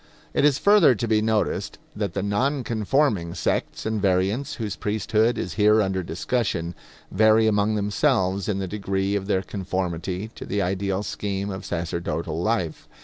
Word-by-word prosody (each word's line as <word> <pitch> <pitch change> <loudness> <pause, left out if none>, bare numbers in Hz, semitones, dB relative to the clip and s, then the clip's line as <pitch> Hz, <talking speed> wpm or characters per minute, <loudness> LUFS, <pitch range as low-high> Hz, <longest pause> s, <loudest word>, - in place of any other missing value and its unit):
It - - +3
is 145 -3 +4
further 200 -10 +5
to 115 +2 -2
be 110 -1 +3
noticed 110 -1 0 0.2
that 100 -4 -3
the 100 - -1
non 130 +7 0
conforming 110 - 0
sects - - -2
and 110 -1 -1
variants 100 +9 +1
whose 105 -4 -4
priesthood 110 +2 +1
is 85 -1 -3
here 105 +1 +6
under 95 -2 0
discussion, 90 -1 -2 0.4
vary 110 +2 +5
among 105 0 +2
themselves 100 -2 +1
in 100 - 0
the 95 -1 -2
degree 100 0 -1
of 95 -1 -2
their 95 -2 +1
conformity 95 +1 -3
to - - -8
the 100 - -1
ideal 95 +1 -1
scheme 100 0 -3
of 95 0 -6
sacerdotal 85 -1 -3
life. 90 -6 -1
100 Hz, 160 wpm, -24 LUFS, 95-110 Hz, 0.4 s, here